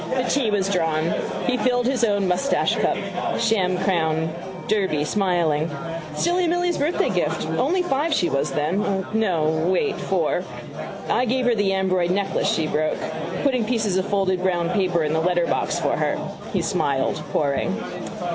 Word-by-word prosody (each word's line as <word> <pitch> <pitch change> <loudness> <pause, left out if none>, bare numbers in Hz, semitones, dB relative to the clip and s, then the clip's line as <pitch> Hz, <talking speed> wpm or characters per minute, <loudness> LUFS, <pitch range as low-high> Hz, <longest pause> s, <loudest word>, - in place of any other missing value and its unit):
The 255 - +2
tea 250 -2 +1
was 200 -2 +1
drawn. 165 -4 +1 0.3
He 250 0 +1
filled 245 -1 +1
his 255 -1 +1
own 205 -3 +2
moustachecup, 185 +9 0
sham 195 -6 +2
crown 160 -4 0 0.3
Derby, 190 -8 +1
smiling. 170 -5 +1 0.5
Silly 350 - +1
Milly's 350 0 +1
birthday 300 +5 +1
gift. - - 0
Only 365 0 +1
five 305 0 0
she 180 - +2
was 140 -2 0
then. 190 +5 0
No, 190 -8 +1 0.2
wait: 300 - +1
four. - - 0 0.7
I 250 - +2
gave 255 +1 0
her 245 - +4
the 205 -3 +1
amberoid 185 -2 +1
necklace 195 +1 0
she 160 - +1
broke. 155 0 0 0.5
Putting 260 -4 +2
pieces 215 -4 0
of 190 +1 0
folded 190 -2 +1
brown 175 -2 +1
paper 180 -6 +1
in 150 0 0
the 160 - +2
letterbox 175 0 +1
for - - +1
her. - - 0 0.3
He - - 0
smiled, 135 0 0
pouring. 140 -2 0
190 Hz, 155 wpm, -23 LUFS, 170-240 Hz, 0.7 s, her